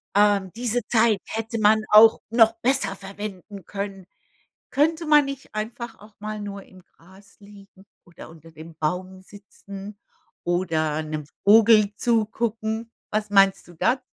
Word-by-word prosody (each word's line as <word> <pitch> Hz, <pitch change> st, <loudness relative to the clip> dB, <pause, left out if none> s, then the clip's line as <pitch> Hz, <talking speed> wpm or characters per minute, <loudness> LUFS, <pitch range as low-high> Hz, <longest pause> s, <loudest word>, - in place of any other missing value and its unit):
ähm, 200 Hz, -2 st, +3 dB
diese 245 Hz, 0 st, 0 dB
Zeit 220 Hz, -3 st, +3 dB
hätte 225 Hz, +1 st, -4 dB
man 215 Hz, +1 st, +4 dB
auch 220 Hz, +1 st, +7 dB
noch 225 Hz, -1 st, +5 dB
besser 245 Hz, -6 st, +1 dB
verwenden 200 Hz, -1 st, -9 dB
können. 195 Hz, -2 st, -6 dB, 0.7 s
Könnte 320 Hz, +3 st, +1 dB
man 300 Hz, -1 st, +5 dB
nicht 275 Hz, -1 st, -8 dB
einfach 230 Hz, +2 st, -6 dB
auch 210 Hz, 0 st, -17 dB
mal 215 Hz, 0 st, -6 dB
nur 200 Hz, -1 st, -7 dB
im 185 Hz, -1 st, -18 dB
Gras 190 Hz, +5 st, -21 dB
liegen 200 Hz, -1 st, -17 dB, 0.2 s
oder 170 Hz, -1 st, -13 dB
unter 165 Hz, 0 st, -16 dB
dem 160 Hz, +2 st, -12 dB
Baum 180 Hz, +4 st, -4 dB
sitzen 200 Hz, +1 st, -12 dB, 0.5 s
oder 160 Hz, -3 st, -1 dB
'nem 155 Hz, -1 st, -5 dB, 0.2 s
Vogel 215 Hz, 0 st, +6 dB
zugucken? 225 Hz, -1 st, -1 dB, 0.2 s
Was 215 Hz, 0 st, -2 dB
meinst 195 Hz, -1 st, +3 dB
du 175 Hz, -, -14 dB
da? 250 Hz, +10 st, +1 dB
205 Hz, 140 wpm, -23 LUFS, 190-225 Hz, 0.7 s, auch